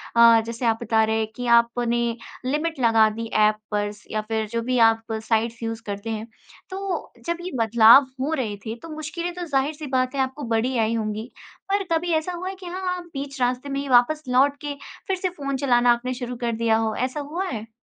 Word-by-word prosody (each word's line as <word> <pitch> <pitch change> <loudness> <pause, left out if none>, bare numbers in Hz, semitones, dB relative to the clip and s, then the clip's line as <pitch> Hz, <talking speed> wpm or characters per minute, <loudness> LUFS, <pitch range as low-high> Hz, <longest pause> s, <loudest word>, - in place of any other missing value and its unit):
अ, 230 -1 +7
जैसे 230 +1 -4
आप 225 -1 +2
बता 220 -1 +2
रहे 220 0 +1
हैं 220 - 0
कि 245 - -5
आपने 235 0 +1 0.5
लिमिट 300 +2 -1
लगा 225 -2 +5
दी 230 +2 -5
ऐप 215 0 +4 0.2
पर 205 0 0
स 210 - -16
या 215 0 -1
फिर 220 -1 -1
जो 230 0 -2
भी 250 +1 -1
आप 225 0 -2
साइट्स 225 +1 -1
यूज़ 225 0 -3
करते 205 +2 -5
हैं। 220 +1 -4 0.4
तो 385 -1 -4
जब 340 0 -1
ये 365 - -5
बदलाव 230 +4 +7
हो 305 +4 0
रहे 220 -8 -2
थे, 220 +1 -4
तो 320 +8 -12
मुश्किलें 335 +3 -4
तो 355 -1 -5
ज़ाहिर 280 0 0
सी 300 -1 -8
बात 255 +1 +1
है 270 - +1
आपको 265 +2 -3
बड़ी 250 +3 0
आई 225 0 +1
होंगी। 215 +2 -3 0.4
पर 400 0 +2
कभी 335 +1 +1
ऐसा 315 +3 0
हुआ 360 +2 -5
है 385 - -6
कि 375 -1 -12
हाँ, 360 +1 -3
आप 355 - -7
बीच 275 0 -6
रास्ते 250 +3 0
में 275 0 -2
ही 280 - -6
वापस 255 +5 +4
लौट 275 +3 +3
के 290 -1 -4 0.3
फिर 380 -1 0
से 370 0 -1
फ़ोन 275 -5 -4
चलाना 245 -3 +4
आपने 250 +2 -3
शुरू 245 0 -5
कर 235 - +1
दिया 225 -1 +2
हो? 220 -1 -1
ऐसा 260 +4 -2
हुआ 325 +7 -3
है? 225 -2 -6
250 Hz, 230 wpm, -24 LUFS, 225-300 Hz, 0.5 s, अ